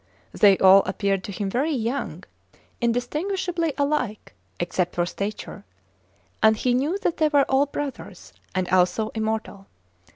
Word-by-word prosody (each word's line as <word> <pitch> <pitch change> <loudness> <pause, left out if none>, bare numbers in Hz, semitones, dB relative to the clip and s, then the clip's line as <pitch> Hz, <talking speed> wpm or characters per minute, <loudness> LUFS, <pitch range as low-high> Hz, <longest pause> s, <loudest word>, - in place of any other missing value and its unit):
They 200 -2 +5
all 190 +1 +7
appeared 195 -2 -1
to - - -6
him 200 +1 -3
very 270 +10 0
young, 250 +2 -3 0.6
indistinguishably 330 +7 -1
alike 280 -7 -2 0.3
(except 175 +1 -1
for 175 - +1
stature), 200 +4 -6 0.8
and 220 0 +5
he 245 +2 +1
knew 290 +9 0
that 345 - 0
they 310 - +3
were 290 -2 +3
all 270 +2 +2
brothers, 285 -1 -7 0.2
and 185 -1 0
also 185 +4 +2
immortal. 220 -3 -4
230 Hz, 135 wpm, -24 LUFS, 195-290 Hz, 0.8 s, all